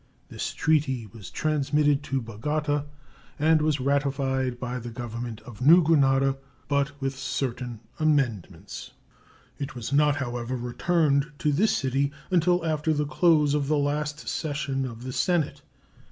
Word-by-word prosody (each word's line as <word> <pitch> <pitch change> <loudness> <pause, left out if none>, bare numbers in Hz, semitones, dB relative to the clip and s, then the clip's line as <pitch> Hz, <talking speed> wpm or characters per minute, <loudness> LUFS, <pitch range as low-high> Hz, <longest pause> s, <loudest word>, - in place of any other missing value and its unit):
This - - -4
treaty 145 -7 +1
was 105 0 -11
transmitted 150 -1 +1
to 135 -2 -1
Bogota 145 +6 -1 0.5
and 155 +1 +4
was 150 -2 +1
ratified 135 -2 0
by 125 0 -3
the 120 0 -7
Government 115 -1 -6
of 120 -2 -12
New 165 +7 +7
Granada, 135 -3 +3 0.3
but 140 0 0
with 135 -1 -2
certain 125 -3 -3 0.2
amendments. 135 - -1 0.7
It 140 -1 -5
was 120 +2 -5
not, 150 0 +4
however, 120 -2 -3
returned 145 +4 +1
to 150 - +1
this 195 +10 +2
city 135 +1 0 0.2
until 175 -1 +3
after 155 0 +1
the 150 0 0
close 150 -2 +3
of 145 -2 0
the 155 +1 +2
last 150 +1 -2
session 140 -4 -2
of 115 -1 -9
the 130 0 -5
Senate. 175 -3 0
140 Hz, 140 wpm, -26 LUFS, 130-150 Hz, 0.7 s, New